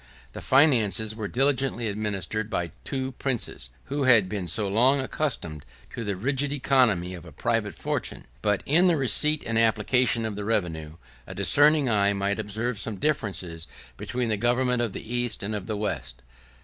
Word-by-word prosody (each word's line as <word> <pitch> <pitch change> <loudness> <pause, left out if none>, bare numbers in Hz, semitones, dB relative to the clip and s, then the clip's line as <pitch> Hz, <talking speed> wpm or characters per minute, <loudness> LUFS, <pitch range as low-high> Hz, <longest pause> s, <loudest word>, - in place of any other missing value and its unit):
The - - -7
finances 110 - +3
were 110 -2 -4
diligently 135 -1 0
administered 105 0 -2
by 85 -5 -2
two 130 -1 -3
princes, 120 - -3
who 140 0 -2
had 115 -7 +6
been 95 -2 -4
so 105 +3 +1
long 125 +8 +3
accustomed 120 - -2 0.3
to 115 - -5
the 100 -2 -2
rigid 135 +7 -1
economy 125 -10 +2
of 90 -3 -9
a - - -12
private - - -1
fortune; - - -3 0.2
but 105 -2 0
in 170 +6 +4
the 170 -3 +3
receipt 150 +3 +2
and 115 0 0
application 115 +1 +2
of 110 -2 -3
the 105 - -5
revenue, 80 -8 -2 0.3
a 95 - -8
discerning 145 - +4
eye 100 -3 +2
might 100 +1 -1
observe 110 +2 -2
some 110 0 -2
difference 110 -5 -1 0.5
between 125 -1 -3
the 105 - 0
government 125 +2 +1
of 115 -5 -2
the - - -8
East 120 -4 0
and 105 +2 -2
of 105 -2 -4
the 110 -2 -3
West. 65 - -4
110 Hz, 175 wpm, -26 LUFS, 100-130 Hz, 0.5 s, had